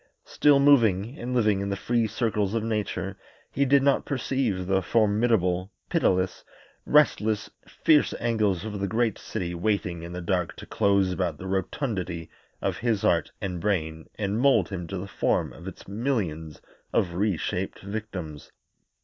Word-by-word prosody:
Still 145 -1 +4
moving 115 -5 +4
and 125 +1 -3
living 105 -5 +3
in 100 0 -2
the 100 - -1
free 115 +3 0
circles 105 -2 -1
of 115 - 0
nature, 110 -2 -3 0.3
he 140 - +1
did 140 0 +4
not 140 -1 +3
perceive 130 -8 -1
the 95 +1 +2
formidable, 105 -3 +2 0.2
pitiless, 95 0 +1 0.4
restless, 110 -8 +3 0.2
fierce 155 -2 +3
angles 110 -5 0
of 105 -2 -4
the 100 - -1
great 110 0 0
city 85 -1 -4
waiting 90 -1 -1
in 85 +1 -7
the 90 - -5
dark 90 -1 -1
to - - -10
close 100 -2 +2
about 90 -4 -1
the 95 - -9
rotundity 95 - -3 0.3
of - - 0
his 115 -4 0
heart - - +2
and 90 -3 -3
brain 80 -6 -1
and 105 +1 -1
mould 120 -9 +4
him 90 -4 -5
to 95 - -4
the 90 - -5
form - - 0
of 85 +4 -11
its 95 - -9
millions 95 - -3 0.3
of 85 -3 +1
re 100 0 +1
shaped 95 +4 -3
victims. 95 -8 -6
100 Hz, 160 wpm, -26 LUFS, 90-115 Hz, 0.4 s, Still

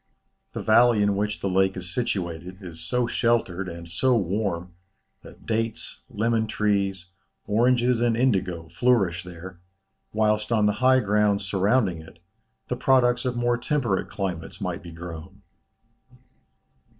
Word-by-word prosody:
The - - -5
valley 115 -1 +5
in 100 -1 +2
which 105 +1 -2
the - - -1
lake 95 0 +2
is 90 -1 -6
situated, 90 -6 -3
is 85 -3 -9
so 120 +9 0
sheltered, 115 -6 0
and 85 0 -8
so 120 +9 +2
warm, 95 -3 -2 0.5
that - - -15
dates, 115 0 -2
lemon 110 +1 0
trees, 100 -4 0 0.4
oranges, 120 +2 +2
and 120 -1 +2
indigo, 95 -9 0
flourish 95 -2 +1
there, 90 +1 -10 0.5
whilst 105 0 +1
on 110 -2 +3
the 105 - +3
high 130 0 +5
ground 105 -1 +2
surrounding 95 -1 +1
it, 80 +2 -15 0.5
the 125 - -2
products 125 -1 +3
of 125 -1 -1
more 120 0 +1
temperate 120 -7 -1
climates 95 -5 -4
might - - -3
be 85 - -10
grown." 85 +3 -9
105 Hz, 140 wpm, -25 LUFS, 90-120 Hz, 0.5 s, valley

